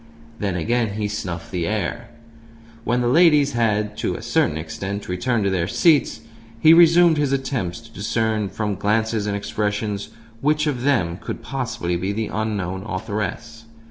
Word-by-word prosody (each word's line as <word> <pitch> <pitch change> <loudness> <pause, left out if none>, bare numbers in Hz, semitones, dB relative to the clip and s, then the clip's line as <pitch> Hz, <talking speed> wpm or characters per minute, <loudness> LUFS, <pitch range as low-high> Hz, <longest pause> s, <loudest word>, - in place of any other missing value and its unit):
Then 100 -3 -1
again 115 +4 0
he 105 -1 -1
snuffed 90 -5 -5
the 85 -3 -2
air. 115 +3 -3 0.8
When 120 +2 +1
the 120 - +1
ladies 150 0 +5
had, 105 -3 0
to - - -1
a - - -7
certain 75 - +1
extent, 95 +6 -5
returned 110 +5 0
to 100 - +1
their 90 -2 0
seats, 155 - +2 0.4
he 155 +7 +7
resumed 170 -1 +6
his 145 -2 +1
attempts 130 -9 -2
to 115 0 -16
discern 110 0 -1
(from 105 0 -2
glances 105 +2 0
and 100 - -1
expressions) 105 0 -2 0.3
which 150 +3 +1
of 140 -5 -1
them 100 -12 +1
could - - -7
possibly 115 -10 -3
be 95 +3 -2
the 110 +1 -3
unknown 100 -4 -2
authoress. 110 +2 -4
110 Hz, 160 wpm, -22 LUFS, 100-125 Hz, 0.8 s, he